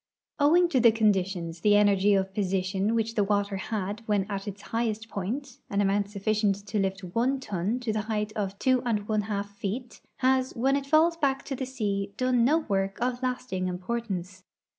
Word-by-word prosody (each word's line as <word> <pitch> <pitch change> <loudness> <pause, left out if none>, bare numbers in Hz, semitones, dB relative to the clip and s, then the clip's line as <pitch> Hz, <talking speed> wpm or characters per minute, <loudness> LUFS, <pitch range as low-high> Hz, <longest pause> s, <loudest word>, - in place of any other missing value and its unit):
Owing 335 +5 +5
to 270 - +2
the 235 -1 +7
conditions, 190 -6 0
the 205 +1 +5
energy 205 -1 +4
of 190 0 0
position 195 +2 0
which 225 0 0
the 210 -3 +2
water 200 -1 0
had 205 +1 -3
when 205 -2 +2
at 195 +1 -4
its 200 0 -7
highest 225 -1 -1
point 240 +8 -4
(an 200 - -1
amount 200 0 +1
sufficient 210 0 +1
to 205 +1 -2
lift 195 0 -1
one 235 +9 0
ton 210 0 -2
to 230 -3 -1
the 215 - 0
height 210 -1 -1
of 200 -2 -3
two 255 +1 +2
and 210 -4 -1
one 215 -1 +1
half 205 -1 -4
feet) 225 +5 -5 0.2
has, 260 0 +2
when 265 +3 +2
it 280 -1 -2
falls 320 +3 +4
back 275 -4 0
to 275 - -3
the 260 0 -4
sea, 200 -5 -2
done 255 -2 +2
no 290 +7 +4
work 195 -6 -1
of 245 +1 -1
lasting 250 -8 -2
importance. 185 -1 -4
210 Hz, 190 wpm, -27 LUFS, 195-245 Hz, 0.2 s, the